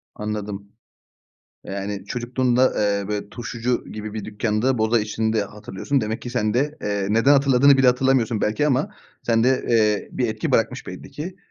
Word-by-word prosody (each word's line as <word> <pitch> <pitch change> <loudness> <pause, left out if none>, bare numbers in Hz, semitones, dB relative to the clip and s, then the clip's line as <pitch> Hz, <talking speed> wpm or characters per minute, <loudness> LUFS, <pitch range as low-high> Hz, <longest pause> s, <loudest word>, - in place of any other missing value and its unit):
Anladım. 105 -1 -5 0.9
Yani, 100 0 -5
çocukluğunda, 125 +2 +1
eee, 100 -1 0
böyle, 105 -1 -3
turşucu 120 +1 -3
gibi 105 0 -6
bir 110 -2 -4
dükkânda 110 +4 0
boza 110 +1 +2
içtiğini 110 +1 -1
de 110 -2 +1
hatırlıyorsun. 105 +6 -3
Demek 110 0 -3
ki 120 - -6
sen 110 -4 0
de, 145 +5 0
eee, 100 -1 -1
neden 115 +6 +4
hatırladığını 140 0 +5
bile 130 - +4
hatırlamıyorsun 125 -3 +2
belki 110 +8 +1
ama 135 0 +1 0.3
sende, 120 +3 +2
eee, 105 -3 +2
bir - - -1
etki - - -3
bırakmış - - +1
belli - - -9
ki. 180 +5 -7
115 Hz, 160 wpm, -22 LUFS, 105-130 Hz, 0.9 s, hatırladığını